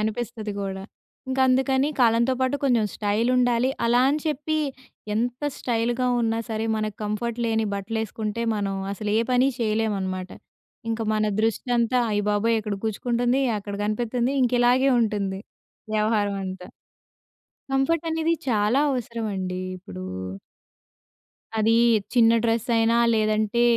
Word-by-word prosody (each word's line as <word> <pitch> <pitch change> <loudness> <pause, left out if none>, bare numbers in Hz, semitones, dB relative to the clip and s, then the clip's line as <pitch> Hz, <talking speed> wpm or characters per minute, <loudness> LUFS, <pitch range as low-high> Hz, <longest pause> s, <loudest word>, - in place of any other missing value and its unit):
అనిపిస్తది 220 0 -3
గూడా. 190 -1 -4 0.5
ఇంకందుకని 265 +1 +2
కాలంతో 235 +1 +4
పాటు 260 +2 +1
కొంచం 235 -5 +3
స్టైలుండాలి. 240 +4 +2
అలా 240 +1 +4
అని 290 +2 +1
చెప్పీ 310 +1 -1 0.6
ఎంత 245 +4 -2
స్టైలుగా 240 +1 0
ఉన్నా 225 -1 0
సరే, 220 0 -2
మనకు 215 -1 -3
కంఫర్ట్ 225 +3 -3
లేని 225 -1 +1
బట్టలేసుకుంటే, 220 +2 -3
మనం 200 -2 -2 0.2
అసలు 205 +1 -4
ఏ - - +4
పని 250 +1 +4
చెయ్యలేవనమాట. 205 -5 -1 0.6
ఇంక 225 0 -2
మన 215 0 +1 0.2
దృష్టంతా, 235 +2 +1
అయ్య 205 -1 0
బాబోయ్! 225 +3 +2
ఇక్కడ 210 -1 -3
గుచ్చుకుంటంది, 240 +4 0 0.2
అక్కడ 205 0 -7
గనిపిత్తంది. 235 +4 -1
ఇంక 250 -1 +1
ఇలాగే 255 +3 +4
ఉంటుంది 200 -4 -1 0.5
వ్యవహారం 210 -2 +1
అంతా. 185 -1 -7 1.0
కంఫర్టనేది 325 +4 +1 0.2
చాలా 215 +3 +2
అవసరమండీ 215 -7 -3 0.2
ఇప్పుడూ. 95 - -9 1.5
అదీ 220 +1 +3 0.4
చిన్న 230 -2 +6
డ్రెసయినా, 230 0 +2 0.2
లేదంటే, 215 +1 +1
225 Hz, 115 wpm, -24 LUFS, 210-245 Hz, 1.5 s, చిన్న